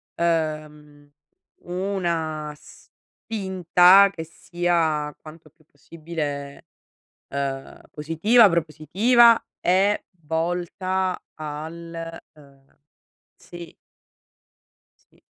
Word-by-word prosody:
uhm, 155 Hz, -3 st, -3 dB, 0.5 s
una 170 Hz, -5 st, -3 dB
spinta 190 Hz, -1 st, +2 dB
che 160 Hz, -4 st, -6 dB
sia 165 Hz, -3 st, -1 dB
quanto 155 Hz, 0 st, -14 dB
più 155 Hz, +1 st, -31 dB
possibile, 145 Hz, -2 st, -7 dB, 0.6 s
ehm, 135 Hz, -1 st, -5 dB
positiva, 195 Hz, +10 st, +4 dB
propositiva 185 Hz, -, +3 dB, 0.2 s
e 195 Hz, +3 st, +2 dB, 0.2 s
volta 180 Hz, +3 st, -2 dB, 0.2 s
al, 165 Hz, +2 st, -7 dB, 0.2 s
uhm 140 Hz, -2 st, -22 dB, 0.6 s
Sì. 175 Hz, -1 st, -12 dB, 1.3 s
Sì. -, -, -29 dB
165 Hz, 65 wpm, -23 LUFS, 150-180 Hz, 1.3 s, positiva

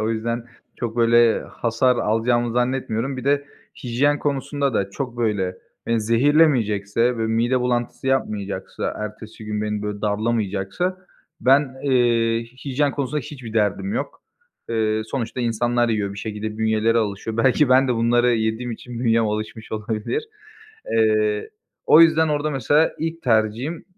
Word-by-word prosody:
o 110 Hz, +1 st, 0 dB
yüzden 115 Hz, +1 st, -2 dB, 0.3 s
çok 120 Hz, -1 st, -4 dB
böyle 115 Hz, -1 st, +4 dB
hasar 120 Hz, +2 st, 0 dB
alacağımı 120 Hz, +2 st, +1 dB
zannetmiyorum. 125 Hz, 0 st, -1 dB
Bir 130 Hz, -, -6 dB
de 140 Hz, 0 st, +2 dB, 0.4 s
hijyen 140 Hz, +5 st, +1 dB
konusunda 140 Hz, -2 st, -1 dB
da 100 Hz, -1 st, 0 dB
çok 125 Hz, +2 st, -5 dB
böyle, 100 Hz, -6 st, -1 dB, 0.3 s
eee, 115 Hz, -1 st, +1 dB
zehirlemeyecekse 115 Hz, -3 st, +2 dB
ve 110 Hz, -, 0 dB
mide 120 Hz, +3 st, +1 dB
bulantısı 125 Hz, +1 st, -2 dB
yapmayacaksa, 105 Hz, -7 st, -2 dB
ertesi 105 Hz, +1 st, -8 dB
gün 105 Hz, 0 st, -3 dB
beni 105 Hz, -1 st, -2 dB
böyle 105 Hz, -1 st, -4 dB
darlamayacaksa, 105 Hz, -, -1 dB, 0.4 s
ben, 135 Hz, 0 st, +3 dB
eee, 120 Hz, -4 st, +2 dB, 0.2 s
hijyen 140 Hz, +1 st, 0 dB
konusunda 145 Hz, +1 st, -2 dB
hiçbir 125 Hz, -4 st, -9 dB
derdim 105 Hz, -, 0 dB
yok. 255 Hz, -, -4 dB, 0.5 s
Eee, 110 Hz, -1 st, 0 dB
sonuçta 125 Hz, 0 st, -4 dB
insanlar 120 Hz, +1 st, +1 dB
yiyor 105 Hz, -3 st, -1 dB
bir 100 Hz, -, -9 dB
şekilde 110 Hz, +1 st, -5 dB
bünyeleri 110 Hz, +1 st, +2 dB
alışıyor. 110 Hz, +1 st, -3 dB
Belki 130 Hz, +4 st, +3 dB
ben 130 Hz, +1 st, +5 dB
de 125 Hz, -, +2 dB
bunları 120 Hz, +1 st, +3 dB
yediğim 110 Hz, +2 st, -1 dB
için 120 Hz, +1 st, -8 dB
bünyem 115 Hz, -2 st, +3 dB
alışmış 110 Hz, +1 st, -5 dB
olabilir. 110 Hz, -, -2 dB, 0.7 s
Eee, 110 Hz, -1 st, +2 dB, 0.4 s
o 155 Hz, -, +7 dB
yüzden 160 Hz, -1 st, +5 dB
orda 150 Hz, 0 st, 0 dB
mesela 145 Hz, +3 st, +2 dB
ilk 165 Hz, +1 st, -4 dB
tercihim, 115 Hz, +7 st, 0 dB
115 Hz, 140 wpm, -22 LUFS, 110-130 Hz, 0.7 s, o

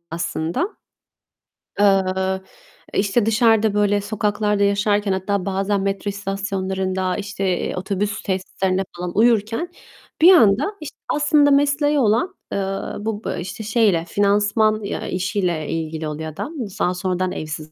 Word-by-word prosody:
aslında. 170 Hz, -, -2 dB, 1.0 s
Eee, 195 Hz, -2 st, +5 dB, 0.9 s
eee, -, -, +1 dB
işte 205 Hz, +3 st, +2 dB
dışarıda 225 Hz, -1 st, +3 dB
böyle 205 Hz, 0 st, +2 dB
sokaklarda 210 Hz, 0 st, 0 dB
yaşarken 205 Hz, 0 st, +1 dB
hatta 190 Hz, 0 st, -1 dB
bazen 195 Hz, +1 st, 0 dB
metro 195 Hz, +1 st, -2 dB
istasyonlarında, 190 Hz, -2 st, -2 dB
işte, 200 Hz, -1 st, -5 dB
eee, -, -, -3 dB
otobüs 200 Hz, +3 st, -2 dB
tesislerinde 190 Hz, 0 st, -1 dB
falan 175 Hz, +1 st, -5 dB
uyurken 230 Hz, -, +2 dB, 0.5 s
bir 355 Hz, +4 st, +9 dB
anda, 280 Hz, -, +4 dB
işte, 305 Hz, -, -8 dB
aslında 295 Hz, -1 st, +3 dB
mesleği 290 Hz, +1 st, +3 dB
olan, 265 Hz, -, +1 dB, 0.2 s
eee, -, -, -1 dB, 0.4 s
bu 215 Hz, 0 st, -4 dB
b -, -, -3 dB
eee, -, -, -4 dB
işte 190 Hz, +6 st, -6 dB
şeyle 210 Hz, -6 st, +2 dB
finansman 210 Hz, +2 st, +2 dB
ya 200 Hz, -, -4 dB
işiyle 180 Hz, -4 st, -1 dB
ilgili 160 Hz, -1 st, -3 dB
oluyor 155 Hz, +1 st, -5 dB
adam. 290 Hz, -, -6 dB, 0.3 s
Daha 180 Hz, -, +1 dB
sonradan 185 Hz, 0 st, -1 dB
evsiz. 155 Hz, -1 st, -6 dB
200 Hz, 130 wpm, -21 LUFS, 185-220 Hz, 1.0 s, bir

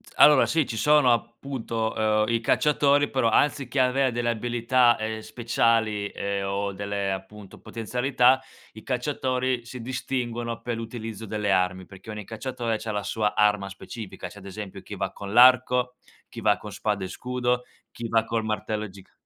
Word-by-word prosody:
Allora 150 Hz, -3 st, +7 dB
sì, 160 Hz, -2 st, +2 dB
ci 115 Hz, -, -5 dB
sono 150 Hz, -1 st, +5 dB
appunto, 115 Hz, -3 st, -1 dB
ehm, 115 Hz, -, -1 dB
i 115 Hz, -, +2 dB
cacciatori, 145 Hz, +3 st, +3 dB
però 130 Hz, -4 st, +2 dB
anziché 135 Hz, +2 st, +1 dB
avere 130 Hz, +1 st, +2 dB
delle 120 Hz, 0 st, -1 dB
abilità, 120 Hz, +1 st, +2 dB
ehm, 110 Hz, 0 st, -3 dB
speciali 110 Hz, -2 st, 0 dB
e 100 Hz, 0 st, -3 dB
o 100 Hz, +1 st, -2 dB
delle 100 Hz, 0 st, -2 dB
appunto 95 Hz, +1 st, -8 dB
potenzialità, 125 Hz, +3 st, +1 dB, 0.3 s
i 110 Hz, -, -11 dB
cacciatori 130 Hz, -1 st, -1 dB
si 125 Hz, +1 st, -8 dB
distinguono 120 Hz, -1 st, -3 dB
per 120 Hz, -1 st, -3 dB
l'utilizzo 115 Hz, -1 st, -6 dB
delle 105 Hz, -1 st, -1 dB
armi, 95 Hz, 0 st, +1 dB
perché 95 Hz, +3 st, -14 dB
ogni 105 Hz, -1 st, -6 dB
cacciatore 115 Hz, 0 st, -3 dB
c'ha 110 Hz, -, -4 dB
la 105 Hz, -1 st, -2 dB
sua 105 Hz, +3 st, -1 dB
arma 105 Hz, -2 st, +2 dB
specifica. 100 Hz, -1 st, -8 dB
C'è 105 Hz, +4 st, -12 dB
ad 100 Hz, -, -14 dB
esempio 100 Hz, 0 st, -7 dB
chi 105 Hz, -, -8 dB
va 95 Hz, -1 st, -3 dB
con 100 Hz, 0 st, -8 dB
l'arco, 125 Hz, 0 st, +5 dB, 0.3 s
chi -, -, -9 dB
va -, -, +3 dB
con -, -, -9 dB
spada -, -, -2 dB
e -, -, -3 dB
scudo, 125 Hz, +3 st, -1 dB, 0.3 s
chi 115 Hz, -, -6 dB
va 115 Hz, 0 st, +2 dB
col 115 Hz, 0 st, -2 dB
martello 110 Hz, 0 st, -3 dB
giga 95 Hz, 0 st, -16 dB
115 Hz, 170 wpm, -25 LUFS, 105-125 Hz, 0.3 s, Allora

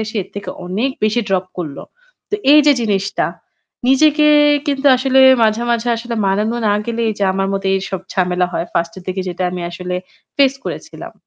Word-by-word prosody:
এসে 220 Hz, +1 st, -7 dB
এর 185 Hz, -, -16 dB
থেকে 200 Hz, -, -6 dB, 0.2 s
অনেক 210 Hz, +9 st, -1 dB
বেশি 215 Hz, +3 st, +1 dB
ড্রপ 190 Hz, -1 st, 0 dB
করল। 155 Hz, -5 st, -5 dB, 0.5 s
তো -, -, 0 dB, 0.2 s
এইযে 295 Hz, -1 st, +6 dB
জিনিসটা 200 Hz, -2 st, -1 dB, 0.6 s
নিজেকে 300 Hz, +3 st, +4 dB, 0.4 s
কিন্তু 280 Hz, -1 st, -1 dB
আসলে 265 Hz, +1 st, +2 dB, 0.2 s
মাঝে, 220 Hz, +1 st, +2 dB
মাঝে 235 Hz, 0 st, 0 dB
আসলে 235 Hz, +1 st, -5 dB
মানানো 210 Hz, +4 st, 0 dB
না -, -, +3 dB
গেলেই 230 Hz, -1 st, -1 dB
যে 200 Hz, -, +1 dB
আমার 195 Hz, 0 st, -1 dB
মতো 195 Hz, 0 st, -3 dB
এইসব 190 Hz, -1 st, -3 dB
ঝামেলা 180 Hz, -1 st, 0 dB
হয়। 170 Hz, -, -2 dB
1st 170 Hz, 0 st, -1 dB
এর -, -, -12 dB
দিকে 185 Hz, 0 st, -3 dB
যেটা 180 Hz, +1 st, -4 dB
আমি 180 Hz, 0 st, -5 dB
আসলে 180 Hz, +1 st, -5 dB, 0.4 s
ফেস 275 Hz, -2 st, +4 dB
করেছিলাম। -, -, -7 dB
205 Hz, 175 wpm, -17 LUFS, 185-240 Hz, 0.6 s, এইযে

